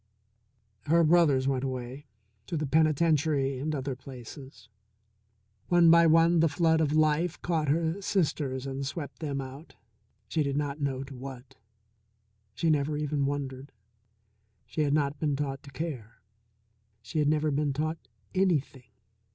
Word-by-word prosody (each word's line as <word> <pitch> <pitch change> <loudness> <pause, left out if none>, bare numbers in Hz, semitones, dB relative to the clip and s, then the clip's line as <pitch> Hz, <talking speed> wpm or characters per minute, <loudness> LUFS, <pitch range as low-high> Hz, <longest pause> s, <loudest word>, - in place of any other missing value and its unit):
Her 165 +2 +4
brothers 155 -5 +4
went 135 -1 0
away 130 +1 -5 0.4
to 165 - -2
the 155 - -1
penitentiary 155 -2 +2
and 155 +3 -2
other 135 -1 -3
places. 130 -1 -11 1.0
One 175 -2 +6
by 170 0 +7
one 165 +1 +5
the 165 0 +4
flood 160 +1 +2
of 150 -2 +1
life 155 +2 +2
caught 160 -3 0
her 165 +5 0
sisters 145 -9 -1
and 135 0 -4
swept 140 0 -6
them 145 -3 -3
out, 135 +4 -9 0.5
she 160 - 0
did 140 -1 -1
not 145 0 -2
know 135 -2 -1
to 135 0 -10
what. 130 0 -9 1.0
She 165 - -1
never 150 0 0
even 150 -2 -1
wondered. 140 -1 -4 0.9
She 155 - -3
had 145 -1 +1
not 145 -1 0
been 150 -3 0
taught 135 -1 -3
to 140 - -13
care. 130 -6 -6 0.9
She 155 +7 -3
had 150 - +2
never 155 0 +1
been 145 0 0
taught 155 +3 -2 0.3
anything. 145 -9 0
145 Hz, 145 wpm, -28 LUFS, 135-160 Hz, 1.0 s, by